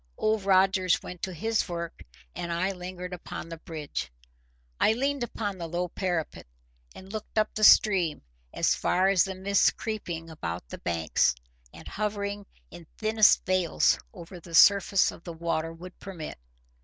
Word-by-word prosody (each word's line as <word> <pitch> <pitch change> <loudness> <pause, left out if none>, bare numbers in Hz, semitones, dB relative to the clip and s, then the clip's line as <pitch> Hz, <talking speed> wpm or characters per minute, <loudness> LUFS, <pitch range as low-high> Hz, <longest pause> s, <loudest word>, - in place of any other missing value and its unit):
Old 215 -2 0
Rogers 190 -2 +3
went 180 -1 -9
to 190 - -3
his 215 +4 -1
work, 170 -1 -5 0.3
and 170 - -4
I 180 +3 0
lingered 180 0 -7
upon 175 - -7
the 165 - -7
bridge. 150 - -6 0.7
I 220 - +4
leaned 275 +3 -1
upon 205 -5 -4
the 170 -1 -5
low 175 +1 -2
parapet, 175 - -3 0.5
and 190 +2 -11
looked 215 0 -7
up 215 0 +2
the 215 - -3
stream 185 -9 +5 0.3
as - - +2
far 185 +2 +2
as 195 -3 +4
the 190 -1 -5
mists 200 +1 +3
creeping 175 -7 -5
about 85 - -5
the - - -8
banks, 80 -6 +1 0.4
and - - -13
hovering 205 -1 -3 0.2
in 170 -2 -12
thinnest 215 -1 +4
veils 185 -3 +2
over 175 -2 -11
the 170 0 -7
surface 200 +3 +6
of - - -14
the 170 - -7
water, 165 -1 -2
would 180 +3 -12
permit. 170 - -8
185 Hz, 160 wpm, -27 LUFS, 170-200 Hz, 0.7 s, surface